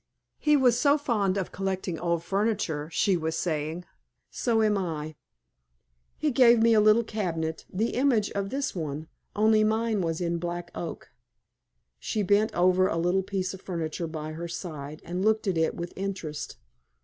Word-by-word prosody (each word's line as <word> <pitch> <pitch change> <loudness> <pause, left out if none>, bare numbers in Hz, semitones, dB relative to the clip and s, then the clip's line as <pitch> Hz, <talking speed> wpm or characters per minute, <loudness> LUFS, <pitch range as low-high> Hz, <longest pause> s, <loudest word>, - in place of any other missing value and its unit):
"He 300 -1 +4
was 245 -3 +4
so 285 0 +4
fond 210 -9 0
of 190 - -2
collecting 190 -3 -3
old 170 -1 0
furniture," 195 -7 -1
she 195 +1 +2
was 160 -1 -2
saying. 160 +1 -2 0.5
"So 225 -2 +1
am 210 -1 +3
I. 160 -5 -3 1.0
He 305 -1 0
gave 240 -2 +6
me 230 0 +5
a 220 - +6
little 215 +2 +5
cabinet, 165 -7 -3
the 220 +5 0
image 250 -6 +2
of 200 -1 -2
this 275 +3 -2
one, 155 -2 -4 0.3
only 215 +1 +4
mine 220 -1 +1
was 165 -2 -1
in 170 -1 -1
black 175 0 -4
oak." 170 - -6 0.9
She 215 -2 -1
bent 205 +3 +3
over 185 +1 +4
a 165 - -1
little 175 +3 +2
piece 190 -1 -3
of 190 - -10
furniture 165 -2 -3
by 155 -1 -5
her 165 +2 -5
side, 155 -4 -7
and 180 +2 -3
looked 220 +1 +2
at 190 -3 0
it 160 0 +1
with 170 0 -6
interest. 185 -6 -5
185 Hz, 170 wpm, -27 LUFS, 165-215 Hz, 1.0 s, gave